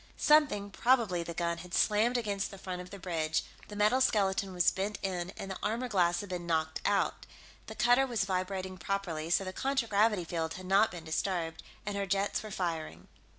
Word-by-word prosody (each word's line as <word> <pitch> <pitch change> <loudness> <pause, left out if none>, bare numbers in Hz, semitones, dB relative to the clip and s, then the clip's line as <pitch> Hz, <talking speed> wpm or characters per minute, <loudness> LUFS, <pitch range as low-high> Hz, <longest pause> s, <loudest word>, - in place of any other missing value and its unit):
Something, 290 -10 +3
probably 230 -7 +2
the 170 0 -6
gun, 170 0 -1
had 175 0 -6
slammed 220 +4 +3
against 205 -4 -1
the 195 - -10
front 185 -1 -5
of 180 - -10
the 200 - -8
bridge 160 -4 -1 0.2
the 210 - -9
metal 210 +5 +3
skeleton 195 -4 +2
was 180 -1 +3
bent 200 +2 -3
in, 180 -2 -2
and 195 - -6
the 190 - -5
armor 230 +4 -1
glass 175 -5 +2
had 205 - -9
been 175 -2 -4
knocked 160 -1 0
out. 205 -1 +1 0.4
The - - -7
cutter 245 +3 +4
was 225 -5 0
vibrating 185 0 -3
properly, 165 -3 -2
so 175 - +3
the 185 0 -5
contragravity 225 -6 +1
field 165 -1 -3
had 185 - -8
not 195 +4 +4
been 175 -2 -8
disturbed, 165 0 -2 0.2
and 205 0 -3
her 200 -1 -2
jets 195 +2 0
were 215 - -8
firing. 160 - -4
190 Hz, 195 wpm, -31 LUFS, 175-210 Hz, 0.4 s, cutter